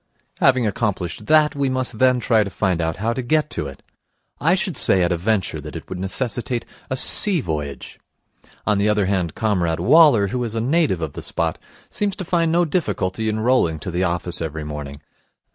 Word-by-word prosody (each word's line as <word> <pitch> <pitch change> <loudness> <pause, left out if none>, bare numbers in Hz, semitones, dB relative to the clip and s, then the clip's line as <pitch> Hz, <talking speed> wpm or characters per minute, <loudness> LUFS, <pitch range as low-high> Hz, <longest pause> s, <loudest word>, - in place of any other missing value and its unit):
Having 130 -3 +4
accomplished 105 -2 -2
that, 155 -1 +4
we 140 -1 0
must 130 -3 -2
then 130 -1 +4
try 110 -2 +3
to 100 - -5
find 95 -3 0
out 80 0 -1
how 110 +4 -1
to 130 - -3
get 150 +4 0
to 75 - -3
it. 70 0 -11 0.6
I 165 +5 +3
should 190 -3 -2
say 95 -6 +3
at 85 - +1
a - - +2
venture 100 +2 -1
that - - -9
it - - -8
would 90 - -5
necessitate 120 +4 -1 0.2
a 130 - -2
sea 190 +6 +1
voyage. 75 - -5 0.7
On 105 -2 +2
the 105 +1 +2
other 105 -2 +2
hand, 90 -4 -1
Comrade 90 -7 0
Waller, 145 -11 +5
who 125 +4 -2
is 115 -1 -4
a - - 0
native 135 - +1
of 80 -3 -4
the - - -7
spot, - - -2 0.3
seems 205 -2 -1
to 185 - -6
find 165 -1 +1
no 175 +1 +3
difficulty 110 - -1
in 110 0 -2
rolling 115 -10 +2
to 85 +4 -6
the 90 +2 0
office 85 -1 0
every 80 -1 -4
morning. 75 -1 -7
110 Hz, 205 wpm, -21 LUFS, 90-130 Hz, 0.7 s, Waller